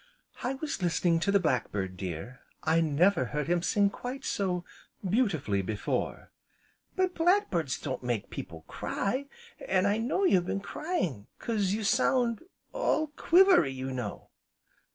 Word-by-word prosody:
"I 255 Hz, +2 st, -1 dB
was 295 Hz, -4 st, -4 dB
listening 170 Hz, -1 st, +2 dB
to 200 Hz, +4 st, +1 dB
the 200 Hz, -, +5 dB
Black 130 Hz, -9 st, 0 dB
bird, 95 Hz, -2 st, -3 dB
dear, 90 Hz, +7 st, -6 dB, 0.2 s
I 160 Hz, +1 st, +3 dB
never 160 Hz, 0 st, +3 dB
heard 150 Hz, +3 st, -3 dB
him 175 Hz, 0 st, +2 dB
sing 200 Hz, +2 st, +2 dB
quite 255 Hz, +5 st, -6 dB
so 180 Hz, -3 st, -1 dB, 0.4 s
beautifully, 175 Hz, -, +1 dB
before." 105 Hz, +2 st, -3 dB, 0.6 s
"But 370 Hz, -1 st, +1 dB
black 360 Hz, +5 st, +3 dB
birds 160 Hz, -7 st, -1 dB
don't 130 Hz, -3 st, -4 dB
make 120 Hz, -4 st, -2 dB
people 80 Hz, -1 st, -7 dB
cry, 260 Hz, +8 st, -2 dB, 0.4 s
an' 185 Hz, 0 st, +2 dB
I 205 Hz, +2 st, +2 dB
know 255 Hz, +12 st, 0 dB
you've 185 Hz, -, +3 dB
been 195 Hz, -, -1 dB
crying 195 Hz, -, -3 dB
'cause 205 Hz, -4 st, 0 dB
you 215 Hz, +1 st, -2 dB
sound 245 Hz, 0 st, +2 dB, 0.3 s
all 315 Hz, -11 st, +1 dB
quivery, 355 Hz, -, +5 dB
you 130 Hz, 0 st, -4 dB
know." 125 Hz, -6 st, -5 dB
185 Hz, 150 wpm, -29 LUFS, -, 0.6 s, the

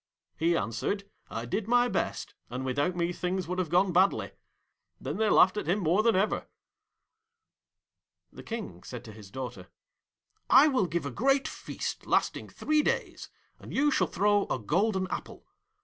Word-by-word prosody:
He 170 Hz, +2 st, +2 dB
answered, 200 Hz, -, -2 dB, 0.2 s
"I 115 Hz, +1 st, -4 dB
did 205 Hz, -, -2 dB
my 245 Hz, +1 st, +4 dB
best, -, -, -2 dB, 0.2 s
and 125 Hz, +2 st, -4 dB
without 145 Hz, +7 st, 0 dB
me 175 Hz, 0 st, 0 dB
things 180 Hz, +1 st, -2 dB
would 180 Hz, +1 st, -2 dB
have 180 Hz, -4 st, -1 dB
gone 180 Hz, +2 st, +3 dB
badly." 185 Hz, +3 st, +3 dB, 0.7 s
Then -, -, -4 dB
they 220 Hz, 0 st, +2 dB
laughed 185 Hz, +3 st, +5 dB
at -, -, -3 dB
him 180 Hz, +4 st, +2 dB
more 180 Hz, +1 st, +2 dB
than 225 Hz, -1 st, +3 dB
ever.' 195 Hz, +3 st, 0 dB, 1.9 s
The -, -, -10 dB
King 220 Hz, -, -6 dB
said 125 Hz, +4 st, -8 dB
to 110 Hz, -, -9 dB
his 105 Hz, -2 st, -12 dB
daughter, 120 Hz, -6 st, -7 dB, 0.8 s
'I 275 Hz, +5 st, +8 dB
will 255 Hz, -10 st, +1 dB
give 170 Hz, -1 st, -2 dB
a 140 Hz, -, -3 dB
great 270 Hz, -, +2 dB
feast -, -, -6 dB
lasting -, -, 0 dB
three 305 Hz, 0 st, +1 dB
days, -, -, -2 dB, 0.3 s
and -, -, -11 dB
you 295 Hz, +2 st, +3 dB
shall 185 Hz, -9 st, +2 dB
throw 205 Hz, +4 st, +2 dB
a -, -, -1 dB
golden 185 Hz, -, 0 dB
apple. -, -, -6 dB
185 Hz, 165 wpm, -29 LUFS, 145-215 Hz, 1.9 s, I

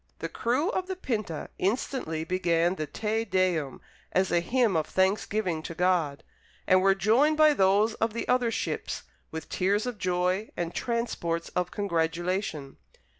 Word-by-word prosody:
The -, -, -4 dB
crew 255 Hz, +10 st, 0 dB
of 370 Hz, -3 st, -2 dB
the 380 Hz, -, -3 dB
Pinta 215 Hz, -, -3 dB
instantly 190 Hz, -, -1 dB
began 170 Hz, 0 st, +1 dB
the 155 Hz, -5 st, -4 dB
Te 220 Hz, +4 st, -1 dB
Deum, 185 Hz, -9 st, 0 dB, 0.3 s
as 190 Hz, 0 st, +1 dB
a 175 Hz, -, +4 dB
hymn 230 Hz, +2 st, +1 dB
of 160 Hz, -, +1 dB
thanksgiving 190 Hz, -2 st, 0 dB
to 165 Hz, -, -7 dB
God, 170 Hz, -5 st, +1 dB, 0.4 s
and 185 Hz, 0 st, +5 dB
were 195 Hz, 0 st, +4 dB
joined 240 Hz, -, +3 dB
by 310 Hz, -1 st, +6 dB
those 205 Hz, -1 st, +3 dB
of 225 Hz, 0 st, -1 dB
the 230 Hz, -, -3 dB
other 250 Hz, -1 st, +2 dB
ships -, -, -3 dB, 0.3 s
with 160 Hz, 0 st, -6 dB
tears 200 Hz, +4 st, +1 dB
of 245 Hz, -5 st, -4 dB
joy 180 Hz, +3 st, 0 dB
and 170 Hz, -1 st, -2 dB
transports 220 Hz, -9 st, -2 dB
of 180 Hz, -1 st, -1 dB
congratulation. 170 Hz, -5 st, -2 dB
190 Hz, 155 wpm, -28 LUFS, 170-225 Hz, 0.4 s, by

